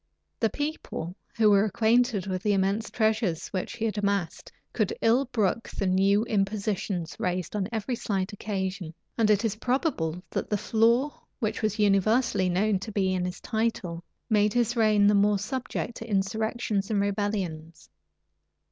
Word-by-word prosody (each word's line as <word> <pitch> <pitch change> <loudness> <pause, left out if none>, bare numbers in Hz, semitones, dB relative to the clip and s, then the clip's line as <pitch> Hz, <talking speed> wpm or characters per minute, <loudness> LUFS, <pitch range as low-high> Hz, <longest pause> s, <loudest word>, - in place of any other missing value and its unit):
The 225 - +2
people, 290 - -4 0.2
who 215 -2 +5
were 200 0 +5
acquainted 220 0 +2
with 185 -2 -3
the 210 +1 +2
immense 195 +3 0
treasures 215 -7 0
which 185 - -3
he 225 -1 -3
had 215 -2 -1
amassed, 200 -4 -2 0.2
could 215 -4 0
ill 240 +5 +3
brook 230 -3 -1
the 195 - -3
new 195 +3 +3
impositions 195 -4 -1
raised 180 +1 -2
on 195 -2 -1
every 225 +2 -2
slight 200 -4 -2
occasion; 190 -5 -4 0.2
and 225 -2 +2
it 210 +2 +3
is 215 -1 -1
probable 215 - -1
that - - -3
the 210 - +1
flaw 235 +7 +2 0.2
which 220 -4 -2
was 215 -2 0
universally 205 0 +3
known 195 +2 +1
to 215 +3 -7
be 190 -2 +1
in 180 -1 -1
his 180 0 -5
title, 220 -7 -2 0.2
made 210 -1 +3
his 240 -1 +1
reign 215 -3 +4
the 205 - +5
more 205 0 +4
subject 240 +2 -4
to 225 - -8
insurrections 215 +1 -1
and 210 -2 +1
rebellions. 195 -6 -2
205 Hz, 160 wpm, -27 LUFS, 190-225 Hz, 0.2 s, who